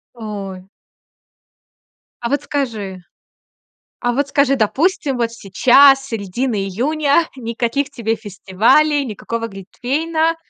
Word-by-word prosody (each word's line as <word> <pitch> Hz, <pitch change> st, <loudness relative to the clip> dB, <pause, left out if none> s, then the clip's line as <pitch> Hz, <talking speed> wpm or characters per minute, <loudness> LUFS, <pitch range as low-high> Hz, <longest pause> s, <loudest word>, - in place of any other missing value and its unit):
Ой. 200 Hz, -5 st, -7 dB, 1.6 s
А 235 Hz, -, -2 dB
вот 285 Hz, +2 st, 0 dB
скажи. 215 Hz, -10 st, -3 dB, 1.0 s
А 245 Hz, -1 st, 0 dB
вот 280 Hz, +3 st, 0 dB
скажи, 275 Hz, -1 st, +3 dB
допустим, 275 Hz, -, 0 dB
вот 230 Hz, -1 st, 0 dB
сейчас, 260 Hz, +6 st, +5 dB
с -, -, -11 dB
середины 225 Hz, +3 st, -2 dB
июня, 290 Hz, -, +1 dB
никаких 235 Hz, +3 st, -2 dB
тебе 230 Hz, -5 st, -2 dB
фестивалей, 225 Hz, +9 st, +2 dB
никакого 230 Hz, +1 st, -4 dB
глинтвейна. 310 Hz, -, -1 dB
245 Hz, 105 wpm, -18 LUFS, 215-285 Hz, 1.6 s, сейчас